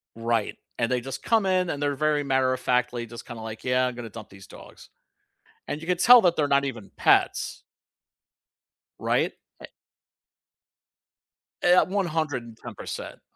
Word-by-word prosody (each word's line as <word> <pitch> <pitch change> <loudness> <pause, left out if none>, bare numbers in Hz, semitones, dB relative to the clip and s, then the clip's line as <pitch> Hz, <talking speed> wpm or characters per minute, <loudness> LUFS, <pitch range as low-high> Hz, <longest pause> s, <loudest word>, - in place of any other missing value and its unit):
Right, 115 -2 -1 0.2
and 115 0 0
they 125 - +1
just 135 +2 -7
come 225 -3 +2
in 185 -2 +1
and 145 - -4
they're 145 -1 +1
very 150 +1 +1
matter 130 -2 +1
of 130 - -3
factly 125 -2 0
just 115 +1 -10
kinda, 120 -2 -8
like, 110 0 -8
"Yeah, 125 0 +2
I'm 125 - -3
gonna 120 -2 -8
dump 110 0 -10
these 95 0 -14
dogs." - - -14 0.8
And 145 - -3
you 165 - -9
could 180 -1 0
tell 245 +3 +8
that 175 -4 +3
they're 150 - +1
not 140 0 +3
even 115 -7 -6
pets. - - +2 1.4
Right? - - 0 0.3
A - - -9 2.0
Uh, - - +4
yeah, 180 +1 +7
110%. 155 - -4
130 Hz, 155 wpm, -25 LUFS, 120-160 Hz, 2.0 s, tell